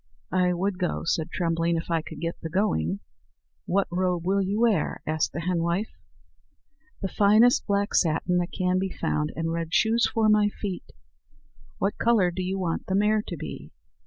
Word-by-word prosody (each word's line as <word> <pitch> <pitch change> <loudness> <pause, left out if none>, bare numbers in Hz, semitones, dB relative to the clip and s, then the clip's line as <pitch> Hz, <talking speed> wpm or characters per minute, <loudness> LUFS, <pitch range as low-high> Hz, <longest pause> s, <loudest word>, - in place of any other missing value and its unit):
"I 180 -1 +3
would 185 +1 -2
go," 180 - -1
said 165 0 0
Trembling, 170 -1 0
"if 165 +1 -5
I 165 -1 +2
could 155 -1 -10
get 165 +1 -4
the 165 - -5
going." 100 - 0 0.7
"What 195 +2 +1
robe 180 -1 0
will 195 +2 +2
you 200 +3 -1
wear?" 215 -10 +1
asked 155 -1 0
the 170 - -4
henwife. 170 +3 -1 1.1
"The - - +1
finest 215 +5 +4
black 200 0 0
satin 175 +2 +2
that 175 0 -2
can 185 -1 0
be 190 0 -1
found, 75 - -2
and 165 0 -2
red 165 0 -2
shoes 230 +2 +3
for 225 -2 +2
my 210 -1 +4
feet." 200 -3 -6 0.9
"What 195 - -1
colour 220 -6 +3
do 185 - -4
you 185 +1 -2
want 175 -3 -2
the 190 - 0
mare 210 +2 +3
to - - -5
be?" - - -7
180 Hz, 180 wpm, -26 LUFS, 165-200 Hz, 1.1 s, finest